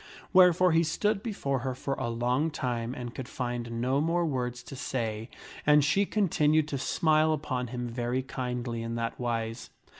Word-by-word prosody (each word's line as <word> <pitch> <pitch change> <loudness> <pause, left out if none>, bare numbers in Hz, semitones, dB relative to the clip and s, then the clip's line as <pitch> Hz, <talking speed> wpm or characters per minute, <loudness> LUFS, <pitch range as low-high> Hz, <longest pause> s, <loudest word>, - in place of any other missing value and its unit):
Wherefore 180 -1 +6
he 165 +1 +4
stood 200 +5 0
before 140 - -2
her 130 0 -3
for 135 +2 -3
a 125 -3 -2
long 125 +6 +1
time 120 -4 -3
and 120 -1 -6
could 130 -2 -7
find 120 -2 -3
no 130 +4 +1
more 170 +2 +1
words 125 -4 -2
to 135 - -9
say, 115 -4 -3 0.3
and 150 -1 +5
she 195 +7 +2
continued 155 -7 +2
to 140 - -2
smile 155 +2 +3
upon 130 -4 -2
him 125 0 -4
very 120 +2 -2
kindly 125 -2 -3
in 115 0 -4
that 115 0 -3
wise. 115 -1 -3
130 Hz, 175 wpm, -29 LUFS, 120-155 Hz, 0.3 s, Wherefore